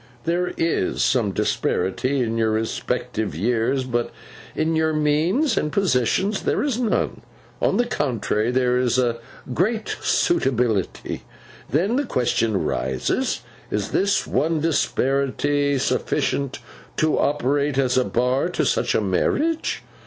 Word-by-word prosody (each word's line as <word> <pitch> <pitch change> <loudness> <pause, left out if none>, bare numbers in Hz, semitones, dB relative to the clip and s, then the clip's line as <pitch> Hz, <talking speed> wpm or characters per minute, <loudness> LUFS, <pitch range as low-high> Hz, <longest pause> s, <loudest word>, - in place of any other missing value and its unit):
There 175 +2 0
is 165 0 0
some 115 -6 +2
disparity 125 +9 0
in 115 -1 -2
your 110 -1 +2
respective 110 -3 -2
years, 120 - +1
but 120 -2 -1 0.5
in 160 +1 0
your 160 0 +2
means 160 - +2
and 150 - 0
positions 190 - +1
there - - 0
is 270 -5 -1
none; 230 -4 0 0.4
on - - +2
the 245 - +3
contrary, 120 - -1
there 125 0 +2
is 125 -1 +1
a 120 -2 +1 0.4
great 215 - 0
suitability. 125 - 0 0.5
Then 190 - +1
the 285 - 0
question 115 - +1
arises, 65 -8 -1 0.3
Is 105 -1 -2
this 200 +1 +2
one 160 +1 0
disparity 140 -1 +1
sufficient 135 +1 -1 0.4
to 155 0 +2
operate 145 0 +1
as 130 -2 +2
a 130 - +4
bar 125 +3 +1
to - - -1
such - - +1
a - - +3
marriage? 300 - 0
135 Hz, 130 wpm, -22 LUFS, 120-165 Hz, 0.5 s, a